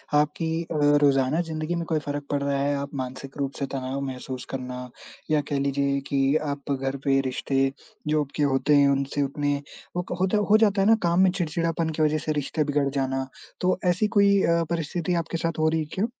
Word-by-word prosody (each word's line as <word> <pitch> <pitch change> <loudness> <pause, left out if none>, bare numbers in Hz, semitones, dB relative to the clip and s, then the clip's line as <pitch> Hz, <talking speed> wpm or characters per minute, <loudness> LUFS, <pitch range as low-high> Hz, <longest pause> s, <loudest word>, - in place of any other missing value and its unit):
आपकी 160 +2 +1
अ, 165 - -6 0.3
रोज़ाना 140 +2 +3
ज़िंदगी 160 0 -3
में 170 -1 -2
कोई 160 -2 +2
फ़र्क 145 0 -4
पड़ 145 - 0
रहा 140 0 0
है? 145 +1 +1
आप 140 0 -4
मानसिक 130 +1 -6
रूप 140 -1 -1
से 140 - 0
तनाव 135 0 -3
महसूस 130 -1 -6
करना 125 -1 -5 0.4
या 150 - +4
कह 145 - 0
लीजिए 140 0 0
कि 135 +1 +2 0.2
आप 140 0 -5
घर 135 0 -1
पे 135 -1 +4
रिश्ते, 135 +1 0 0.4
जो 150 0 +2
आपके 145 +1 -3
होते 140 +1 +3
हैं 140 -1 +6
उनसे 140 +1 0
उतने 145 +1 0 0.4
वो 180 - +1
क - - -1
होता 190 +3 +2
है 210 - +2
हो 215 - +7
जाता 205 -3 +3
है 195 - +3
ना 225 - +7
काम 170 +1 +2
में 190 - +6
चिड़चिड़ापन 165 -2 -1
के - - 0
वजह 155 0 +2
से 155 0 -3
रिश्ते 150 +1 -1
बिगड़ 145 -1 +1
जाना। 135 -1 -1 0.3
तो 185 0 +2
ऐसी 180 +4 +2
कोई 200 -1 +5
अ, 170 0 +3
परिस्थिति 170 +1 -2
आपके 165 +1 -4
साथ 165 -1 -2
हो 155 - +3
रही 160 0 0
है 155 - -2
क्या? 195 - +1
145 Hz, 220 wpm, -25 LUFS, 135-165 Hz, 0.4 s, हो